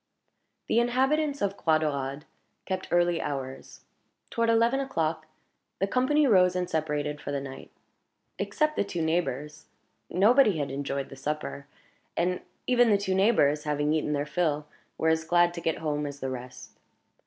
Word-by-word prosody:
The 230 - +3
inhabitants 270 +4 +1
of 200 0 0
Croix 160 -1 +3
Daurade 140 -2 -2 0.4
kept 185 0 -3
early 175 -1 +2
hours. 135 -2 -6 0.5
Toward 230 0 +1
eleven 230 +3 +3
o'clock, 160 -12 -2 0.5
the 195 - +1
company 260 +8 +2
rose 185 -7 +4
and 180 -1 -1
separated 150 -2 -2
for 145 - -5
the 140 - -1
night. 135 -1 -9 0.7
Except 305 0 0
the - - +1
two 175 -4 -3
neighbors, 150 -3 -2 0.4
nobody 215 +1 +4
had 145 -3 -2
enjoyed 140 0 -3
the - - -10
supper, 140 0 -4 0.5
and 180 +1 0 0.2
even 245 -2 +4
the 205 - +5
two 195 -1 -1
neighbors, 180 -7 +3
having 150 0 0
eaten 150 -1 0
their 145 0 -1
fill, 150 -2 0 0.3
were 160 - +2
as 160 0 +2
glad 175 +1 +3
to 170 - -6
get 160 -1 0
home 150 -2 -2
as 140 0 -8
the 135 -1 -3
rest. 125 -1 -9
160 Hz, 160 wpm, -28 LUFS, 145-200 Hz, 0.7 s, the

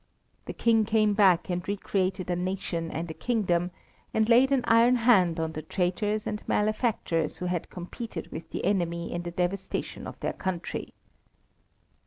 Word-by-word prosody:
The - - -5
King 225 -2 +3
came 215 -1 +2
back 190 -4 +4
and 175 0 -3
re 200 +1 -1
created 185 -2 -1
a - - +1
nation 180 -2 -2
and 165 +1 -4
a - - -5
kingdom, 180 -6 0 0.5
and 220 0 +3
laid 250 +4 +5
an 265 -3 +3
iron 230 +2 +6
hand 195 -9 +4
on 160 0 -1
the 155 - -5
traitors 200 +6 -1
and 210 - -3
malefactors 210 - 0
who 180 - -4
had 180 -2 -2
competed 180 +1 -7
with 160 - -7
the - - -4
enemy 170 -4 0
in 175 - -2
the 175 - -5
devastation 180 +3 -3
of - - -9
their - - -2
country. 185 -2 -4
185 Hz, 170 wpm, -28 LUFS, 175-215 Hz, 0.5 s, iron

